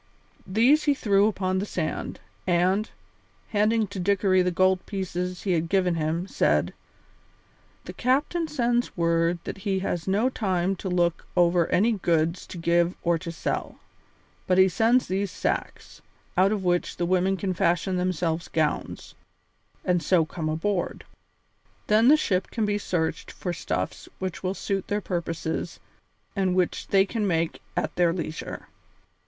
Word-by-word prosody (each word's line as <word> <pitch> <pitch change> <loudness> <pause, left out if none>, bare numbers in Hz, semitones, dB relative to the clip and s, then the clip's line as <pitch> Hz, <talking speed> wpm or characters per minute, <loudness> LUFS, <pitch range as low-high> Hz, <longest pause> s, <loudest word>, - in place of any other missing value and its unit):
These 245 +10 +4
he 290 -2 +3
threw 205 -4 +3
upon 185 -3 0
the 200 - -2
sand - - -3 0.3
and, 185 +4 +2 0.6
handing 215 +1 +2
to 200 - -6
Dickory 190 0 +3
the 180 - +2
gold 185 +1 +2
pieces 180 -2 -3
he 195 - 0
had 165 -1 0
given 185 -2 +2
him, 165 +2 -1
said: - - +1 1.1
"The - - -7
captain 295 +7 +1
sends 240 -7 0
word 170 0 +2
that - - -6
he 195 -1 -1
has 170 0 -2
no 205 +6 +2
time 190 -6 0
to 190 - -4
look 175 -2 0
over 175 -1 +4
any 220 +6 +3
goods 170 -4 0
to - - -8
give 170 +1 +2
or 170 -1 +2
to 170 0 -6
sell, 160 - -3 0.7
but 185 - +3
he 190 0 +7
sends 225 +7 +3
these 195 +1 -1
sacks, - - -4 0.3
out 190 +2 +4
of 210 -3 -1
which 175 -1 0
the 175 - 0
women 185 +2 +2
can 190 0 -2
fashion 180 +2 +1
themselves 175 -2 -1
gowns, 155 -2 -2 0.7
and 180 -1 +2
so 170 -2 +3
come 155 0 -4
aboard. 175 +4 -2 0.8
Then 215 +3 +4
the 300 +3 +7
ship 185 -10 0
shall 225 -3 0
be 205 0 0
searched 165 -5 -2
for 180 - -4
stuffs 170 - -4
which 185 -2 -4
will 185 +1 -2
suit 195 -2 -2
their 205 - 0
purposes 170 -4 -3 0.6
and 190 -2 +1
which 185 -1 0
they 195 -1 +4
can 210 +1 -2
make 165 -2 -1 0.2
at 155 - -1
their 175 -1 +3
leisure." 165 -2 -5
185 Hz, 155 wpm, -26 LUFS, 170-200 Hz, 1.1 s, he